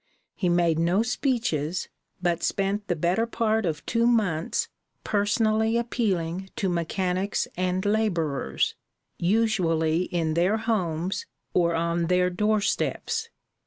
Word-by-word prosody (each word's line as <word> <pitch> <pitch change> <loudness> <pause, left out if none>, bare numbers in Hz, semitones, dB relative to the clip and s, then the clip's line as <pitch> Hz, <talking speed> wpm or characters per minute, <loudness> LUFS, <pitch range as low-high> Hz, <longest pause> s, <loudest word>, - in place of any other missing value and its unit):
He 180 -4 -1
made 170 -2 +2
no 175 +6 +3
speeches, 225 - -1 0.4
but 175 -1 +1
spent 200 +1 -1
the 175 - 0
better 175 +8 +1
part 220 -3 +1
of 155 -2 -3
two 230 0 +2
months 200 -9 +1 0.4
personally 220 +2 +2
appealing 190 -7 -1
to 195 -5 0
mechanics 180 +3 -1
and 185 +1 -1
laborers, 170 - 0 0.5
usually 175 -5 +2
in 165 -3 -1
their 180 +6 +2
homes 185 -6 -1 0.3
or 170 -1 +2
on 170 0 0
their 180 0 +2
doorsteps. 215 - 0
185 Hz, 115 wpm, -26 LUFS, 170-220 Hz, 0.5 s, no